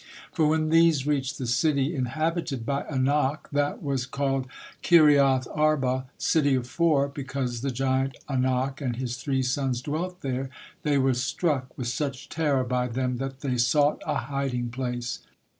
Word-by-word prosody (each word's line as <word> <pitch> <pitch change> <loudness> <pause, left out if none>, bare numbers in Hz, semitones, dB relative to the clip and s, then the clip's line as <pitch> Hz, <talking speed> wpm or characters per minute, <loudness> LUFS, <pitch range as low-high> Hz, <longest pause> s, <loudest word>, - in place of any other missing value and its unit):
For 160 -3 +2
when 155 0 +1
these 165 -4 +4
reached 145 -1 -1
the 130 - -4
city 140 +4 +1
inhabited 155 0 -2
by 140 +2 -1
Anak, 140 +1 0
that 145 +1 -1
was 135 -3 -1
called 135 -1 -1 0.3
Kiriath 140 -6 +5
Arba, 135 -4 +1
"City 145 -4 +2
of 125 -2 -1
Four," 145 0 +2
because 135 -4 -4
the 135 - -1
giant 130 0 0
Anak 130 +1 0
and 125 -4 -1
his 125 0 -3
three 130 +1 -1
sons 130 -1 0
dwelt 170 +7 -4
there, 130 0 -3 0.3
they 145 -2 +1
were 135 -1 +3
struck 130 +1 -1
with 125 - -3
such 135 +1 -3
terror 145 -5 +1
by 125 0 0
them 125 +1 -2
that 135 +1 -5
they 125 -3 -1
sought 145 +5 +3
a - - 0
hiding 135 -4 -2
place. 120 -1 -3
135 Hz, 160 wpm, -26 LUFS, 130-145 Hz, 0.3 s, Kiriath